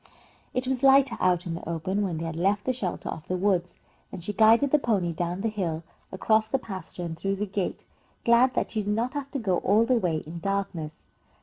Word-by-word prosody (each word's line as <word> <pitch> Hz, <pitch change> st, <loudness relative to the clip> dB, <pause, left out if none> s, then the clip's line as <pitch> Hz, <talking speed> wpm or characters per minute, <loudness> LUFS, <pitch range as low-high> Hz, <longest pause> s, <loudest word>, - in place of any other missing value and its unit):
It 255 Hz, +1 st, 0 dB
was 260 Hz, -1 st, -1 dB
lighter 270 Hz, -2 st, +5 dB
out 180 Hz, -1 st, +2 dB
in 170 Hz, -, -3 dB
the 165 Hz, -, -6 dB
open, 185 Hz, +5 st, -1 dB
when 185 Hz, -5 st, -1 dB
they 165 Hz, -, -4 dB
had 165 Hz, -1 st, -4 dB
left 195 Hz, +4 st, +1 dB
the 255 Hz, -, +1 dB
shelter 205 Hz, -8 st, -4 dB
of 160 Hz, +3 st, -6 dB
the 185 Hz, -, -1 dB
woods, 180 Hz, -2 st, 0 dB, 0.4 s
and 180 Hz, -3 st, -7 dB
she 210 Hz, -, -2 dB
guided 225 Hz, +6 st, +5 dB
the 300 Hz, -, +5 dB
pony 195 Hz, -10 st, 0 dB
down 175 Hz, +3 st, -3 dB
the 225 Hz, -, 0 dB
hill, 175 Hz, -7 st, -2 dB, 0.3 s
across 220 Hz, +3 st, +2 dB
the 270 Hz, -, +2 dB
pasture, 185 Hz, -7 st, -7 dB
and 165 Hz, -1 st, -4 dB
through 195 Hz, +4 st, -2 dB
the 205 Hz, +2 st, -2 dB
gate, 195 Hz, -1 st, -3 dB, 0.4 s
glad 240 Hz, +2 st, +5 dB
that -, -, -1 dB
she 215 Hz, -, -1 dB
did 205 Hz, 0 st, -1 dB
not 235 Hz, +3 st, -1 dB
have 285 Hz, -2 st, -4 dB
to 280 Hz, -, -4 dB
go 195 Hz, -8 st, 0 dB
all 210 Hz, +6 st, +3 dB
the 255 Hz, -, +2 dB
way 165 Hz, -6 st, -1 dB
in 165 Hz, +3 st, -7 dB
darkness. 190 Hz, -5 st, -3 dB
195 Hz, 230 wpm, -27 LUFS, 175-230 Hz, 0.4 s, lighter